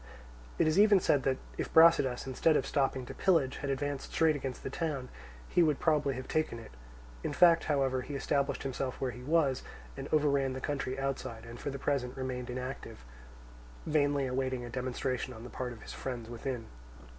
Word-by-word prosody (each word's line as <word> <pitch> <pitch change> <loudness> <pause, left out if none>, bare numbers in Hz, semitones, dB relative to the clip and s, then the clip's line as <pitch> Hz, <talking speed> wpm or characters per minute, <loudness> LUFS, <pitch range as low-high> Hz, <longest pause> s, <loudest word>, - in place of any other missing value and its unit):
It - - +3
is 155 +4 +3
even 205 -1 +7
said 145 -5 +3
that 130 -1 +2 0.2
if - - -2
Brasidas, 160 -6 +5
instead 150 +4 +2
of - - -1
stopping 135 -2 0
to - - -7
pillage, 160 -9 +2
had 140 - -4
advanced 140 0 -2
straight 160 -1 +3
against 135 -3 -5
the - - -4
town, 140 -5 -3 0.4
he 175 - +3
would 155 -4 +3
probably 150 -4 +2
have 130 +1 -6
taken 155 -6 0
it. 115 - -11 0.5
In - - -2
fact, 170 +1 +6
however, 135 -3 +1
he 145 +3 -6
established 140 0 0
himself 135 -1 -3
where 130 -2 -1
he 125 - -10
was 140 -2 +2 0.3
and 135 +1 -6
overran 140 -3 +2
the 130 - -4
country 135 -2 -2
outside, 135 -4 -3
and 115 0 -9
for - - -3
the 140 - -4
present 135 -2 -1
remained 125 -1 -4
inactive, 125 - -6 0.8
vainly 145 -2 +2
awaiting 130 -1 -2
a 120 - -8
demonstration 125 0 -2
on 110 - -10
the 125 - -9
part 125 -1 -4
of 115 -3 -11
his - - -8
friends 120 -3 -5
within. 120 0 -4
135 Hz, 190 wpm, -31 LUFS, 125-145 Hz, 0.8 s, even